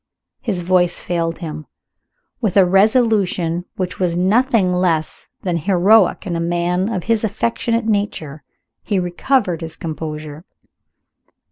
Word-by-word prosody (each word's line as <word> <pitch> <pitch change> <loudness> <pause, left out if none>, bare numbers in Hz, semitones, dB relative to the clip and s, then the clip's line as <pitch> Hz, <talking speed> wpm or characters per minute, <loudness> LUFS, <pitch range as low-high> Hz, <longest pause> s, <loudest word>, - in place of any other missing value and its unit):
His 195 -7 -2
voice 175 0 +2
failed 170 -1 -2
him. 155 -3 -7 0.7
With 210 -5 0
a 190 - +7
resolution 195 -4 +2
which 185 -1 -4
was 175 -2 0
nothing 205 0 +2
less 170 -4 -1 0.2
than 180 -3 0
heroic 195 +5 +3
in 175 -3 -3
a - - -1
man 175 +3 0
of 190 -6 -3
his 230 -1 0
affectionate 230 +2 -1
nature, 200 -9 -2 0.4
he 205 - -1
recovered 180 +1 0
his 160 0 -6
composure. 155 -1 -6
180 Hz, 125 wpm, -19 LUFS, 170-210 Hz, 0.7 s, a